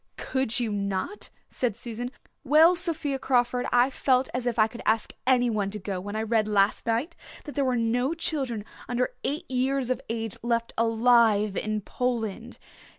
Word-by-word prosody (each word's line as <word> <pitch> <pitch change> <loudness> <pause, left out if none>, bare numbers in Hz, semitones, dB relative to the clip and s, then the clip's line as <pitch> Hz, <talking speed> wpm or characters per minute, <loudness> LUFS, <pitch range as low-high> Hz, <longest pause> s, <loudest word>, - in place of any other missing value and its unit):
"Could 260 -3 -1
you 235 -3 -1
not?" 200 - -3 0.2
said 235 -5 -1
Susan. 240 +1 -5 0.3
"Well, 310 +5 +6
Sophia 325 -6 -1
Crawford, 245 -1 +1
I 245 +2 +4
felt 260 -1 +2
as 250 0 -2
if 240 -1 -1
I 215 - +6
could 235 +2 -8
ask 220 0 +1
anyone 240 -6 +2
to 210 - -5
go 195 -2 -4
when 205 +2 -6
I 220 - -1
read 220 -1 +1
last 205 +1 +2
night 240 +9 0 0.3
that 295 - -8
there 285 - 0
were 255 -2 +1
no 245 +6 +1
children 265 -10 -1 0.2
under 245 +1 0
eight 290 +2 -2
years 260 0 0
of 255 - -1
age 225 -2 -3
left 235 0 -1
alive 225 -3 +3
in 215 0 -2
Poland. 235 0 -3
240 Hz, 170 wpm, -26 LUFS, 220-260 Hz, 0.3 s, Well